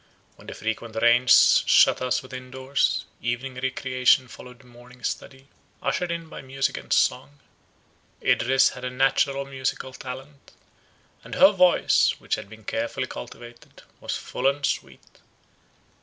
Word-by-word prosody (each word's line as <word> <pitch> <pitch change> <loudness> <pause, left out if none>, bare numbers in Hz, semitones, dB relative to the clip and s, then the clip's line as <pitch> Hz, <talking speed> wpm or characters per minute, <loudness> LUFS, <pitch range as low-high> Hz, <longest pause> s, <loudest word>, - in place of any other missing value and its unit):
When - - -18
the - - -7
frequent 110 +1 -4
rains 120 +2 +5
shut - - +5
us 130 0 -1
within 130 0 -9
doors, 130 +2 -1 0.2
evening 125 +2 -3
recreation 130 0 +2
followed 125 +1 -13
morning 125 0 -17
study, 135 0 -5 0.3
ushered 180 -1 -2
in 170 -1 -4
by - - -9
music 135 0 -2
and - - -10
song. 135 +3 +1 0.8
Idris 135 +2 +3
had 125 - -10
a 125 - -2
natural 135 +2 +1
musical 130 -1 -4
talent; 135 +3 -10 0.7
and - - -8
her 190 - +7
voice, 180 -3 +3
which - - -5
had 100 - -3
been 110 0 -14
carefully 115 +3 -3
cultivated, 120 - -11 0.2
was - - -4
full 130 - -3
and 140 +1 0
sweet. - - -5
130 Hz, 140 wpm, -24 LUFS, 125-135 Hz, 0.8 s, her